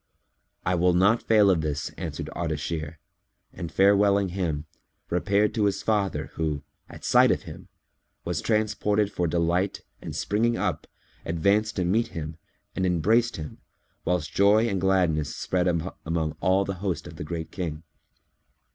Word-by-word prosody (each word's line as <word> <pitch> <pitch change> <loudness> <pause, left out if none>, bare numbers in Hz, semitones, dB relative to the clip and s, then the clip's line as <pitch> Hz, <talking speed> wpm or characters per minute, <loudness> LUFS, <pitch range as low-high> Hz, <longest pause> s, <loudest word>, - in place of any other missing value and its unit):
"I 90 - +2
will 90 0 +3
not 105 +6 +4
fail 105 -3 +5
of 85 -4 +2
this," 75 -2 -3
answered - - -5
Ardashir 80 -1 -3 0.6
and 85 -2 -6
farewelling 100 0 +4
him, 85 -5 -2 0.5
repaired 100 +4 +2
to 105 -3 +1
his 100 - 0
father 105 -3 0
who, 75 -3 -2 0.3
at - - -10
sight - - +5
of - - +1
him, - - -10 0.6
was 85 -2 -2
transported 105 -1 +1
for 90 -3 -1
delight 85 +4 0 0.2
and - - -6
springing 115 +3 +1
up, 90 -6 -2 0.4
advanced 100 +6 +1
to 90 - 0
meet 110 +6 +2
him 80 -5 -6 0.4
and 95 - -1
embraced 105 +7 +2
him, 75 -2 -7 0.4
whilst 90 -4 -1
joy 105 +3 +4
and 95 -5 -1
gladness 90 -6 +1
spread 90 0 0
among 80 -2 -2
all 95 +1 +2
the 95 - -2
host 90 -5 -2
of 85 -2 -10
the - - -5
Great 80 +1 -5
King. 80 -4 -4
90 Hz, 150 wpm, -26 LUFS, 80-100 Hz, 0.6 s, fail